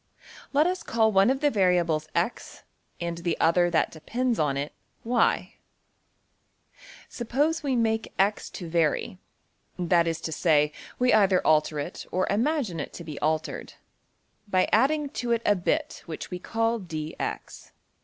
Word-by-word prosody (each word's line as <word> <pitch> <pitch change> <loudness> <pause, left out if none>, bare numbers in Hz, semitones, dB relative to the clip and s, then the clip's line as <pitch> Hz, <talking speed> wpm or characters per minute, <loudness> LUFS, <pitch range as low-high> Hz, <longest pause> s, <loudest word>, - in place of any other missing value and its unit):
Let 290 +2 +4
us 365 +1 -1
call 220 -1 +2
one 195 +2 +4
of 265 +1 0
the 295 -1 +3
variables~$x$, 175 - 0 0.4
and 170 -1 -3
the 170 -1 -2
other 175 +2 +3
that 165 -2 +1
depends 240 +9 -2
on 140 -3 +1
it~$y$. 225 - -1 1.5
Suppose 290 +7 -1
we 275 -4 0
make 225 -1 0
$x$ 200 +2 +1
to 175 - -7
vary, 165 +2 0 0.6
that 175 -1 +2
is 165 -1 -1
to 160 - -4
say, 150 -2 +3 0.3
we 250 0 +3
either 195 -4 +4
alter 155 0 +3
it 145 +4 -5
or 185 +1 +1
imagine 230 - 0
it 145 - -5
to 170 - -8
be 155 -3 -7
altered, 155 +1 -2 0.7
by 185 -2 +2
adding 285 +6 +3
to 240 -3 -1
it 235 0 -1
a 205 - +4
bit 300 - -1
which 160 +2 -7
we 180 - -4
call~$dx$. 190 -9 -3
185 Hz, 145 wpm, -26 LUFS, 165-235 Hz, 1.5 s, Let